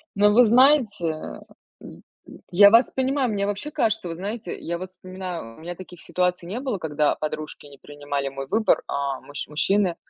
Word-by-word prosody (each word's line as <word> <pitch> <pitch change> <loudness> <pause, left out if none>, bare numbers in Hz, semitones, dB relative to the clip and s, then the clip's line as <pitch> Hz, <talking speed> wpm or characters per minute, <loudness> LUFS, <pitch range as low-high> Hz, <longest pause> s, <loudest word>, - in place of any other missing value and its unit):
Ну, 205 +1 +5
вы 240 +4 +7
знаете, 240 - +4
э, 155 -1 -5 0.4
м, - - -12 0.2
м, - - -13
я 200 +3 +8
вас 230 +4 +5
понимаю. 265 0 0
Мне 200 -1 -1
вообще 205 +9 -4
кажется, 220 -7 0
вот 165 - -5
знаете, 205 +1 -5
я 170 +1 -4
вот 185 +1 -8
вспоминаю, 185 -9 -7
у - - -15
меня 175 +2 -6
таких 180 -2 -12
ситуаций 180 -1 -1
не 210 +7 -4
было, 260 -6 -2
когда 150 -3 0
подружки 155 0 -6
не 140 -2 -14
принимали 145 -1 -4
мой 135 0 -7
выбор, 220 +8 +2
а, 140 -1 -2
мущ 145 - -7
мужчины. 185 +4 +1
185 Hz, 190 wpm, -24 LUFS, 155-215 Hz, 0.4 s, я